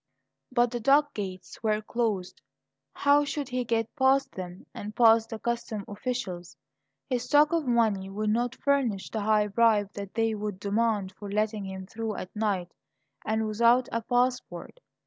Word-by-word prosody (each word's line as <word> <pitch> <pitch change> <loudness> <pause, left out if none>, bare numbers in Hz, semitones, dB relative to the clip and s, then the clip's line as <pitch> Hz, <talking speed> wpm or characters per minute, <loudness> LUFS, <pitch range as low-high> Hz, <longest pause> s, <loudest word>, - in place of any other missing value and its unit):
But 240 -1 +2
the 240 - -3
dock 285 +5 +3
gates 190 -3 -7
were 215 -1 +1
closed. 215 -4 -2 0.5
How 285 +1 +3
should 285 -1 -3
he 250 0 -1
get 230 -1 -1
past 270 -1 +3
them, 180 -1 -8
and 210 0 -7
past 225 -1 +5
the 225 - -5
customs 235 -3 -3
officials? 205 -6 -5 0.5
His 245 -2 -1
stock 295 +5 +4
of 325 -5 0
money 220 -5 +2
would 210 +2 -1
not 240 +2 0
furnish 260 -9 0
the 220 - -2
high 210 0 +3
bribe 210 -1 +2
that 200 -1 -7
they 225 -1 +1
would 210 -2 -4
demand 205 -1 0
for 205 - -7
letting 210 0 -1
him 190 0 -6
through 220 +1 -4
at 185 - -7
night 200 -5 -1 0.5
and 220 0 0
without 235 +3 +3
a 230 - -1
passport. 250 - -1
225 Hz, 165 wpm, -28 LUFS, 205-245 Hz, 0.5 s, past